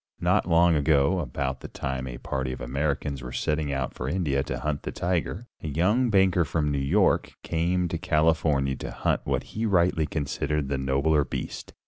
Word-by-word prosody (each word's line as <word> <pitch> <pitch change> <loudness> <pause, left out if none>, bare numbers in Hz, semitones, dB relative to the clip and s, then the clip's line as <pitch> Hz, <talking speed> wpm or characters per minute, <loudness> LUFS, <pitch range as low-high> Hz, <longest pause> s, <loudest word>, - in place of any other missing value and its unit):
Not - - +2
long 85 +1 +5
ago, 75 +3 +3
about 65 -2 -3
the - - -8
time 65 -1 -4
a - - -6
party 65 -1 -3
of 65 - -6
Americans 70 +2 -2
were 60 0 -7
setting 75 +2 -1
out 70 -2 -2
for 65 - -4
India 75 -5 0
to 65 -2 -4
hunt 75 0 -2
the - - -5
tiger, 90 +5 -2 0.2
a - - -5
young 100 - +2
banker 95 -4 +4
from 75 -1 -1
New 70 - 0
York 90 +9 +2
came 90 +2 0
to 85 - -3
California 80 -5 +2
to - - -6
hunt - - 0
what - - 0
he 110 +1 -1
rightly 85 -5 +2
considered 75 -1 -2
the 70 -1 -1
nobler 70 +3 +2
beast. - - -6
75 Hz, 185 wpm, -26 LUFS, 70-85 Hz, 0.2 s, long